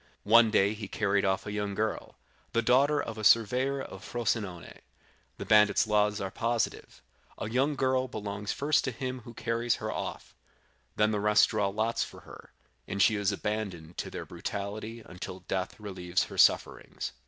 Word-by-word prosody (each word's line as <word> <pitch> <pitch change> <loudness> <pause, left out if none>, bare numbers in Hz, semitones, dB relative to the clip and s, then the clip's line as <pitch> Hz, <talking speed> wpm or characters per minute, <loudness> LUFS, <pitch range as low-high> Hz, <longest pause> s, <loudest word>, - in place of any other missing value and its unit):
"One 115 +2 +6
day 100 0 +3
he 105 -2 -7
carried 100 0 0
off 95 -1 0
a 105 - -4
young 105 -1 -3
girl, 110 +1 -2 0.4
the 115 - +2
daughter 140 +5 +4
of 115 -5 -4
a - - -5
surveyor 125 +6 +3
of - - -10
Frosinone. 105 -7 -3 0.6
The - - -6
bandit's 105 +1 +5
laws 105 -1 +2
are 95 -1 -4
positive; 115 +1 -2 0.3
a - - -4
young 135 +4 +1
girl 130 -1 +1
belongs 105 -3 -4
first 145 +1 +1
to 130 - -1
him 130 +2 -4
who 120 - -11
carries 115 +1 0
her - - -4
off, - - -5 0.6
then 105 0 +3
the 105 - 0
rest 105 0 +4
draw 105 -2 +1
lots 110 +4 0
for - - -10
her, - - -13 0.4
and 100 - -4
she 110 +2 +5
is 100 -1 +1
abandoned 100 -6 -4
to - - -3
their - - -6
brutality 105 +3 -5
until 90 +1 -8
death 95 +2 -3
relieves 95 -4 -2
her - - -8
sufferings. - - +2
105 Hz, 175 wpm, -29 LUFS, 100-115 Hz, 0.6 s, One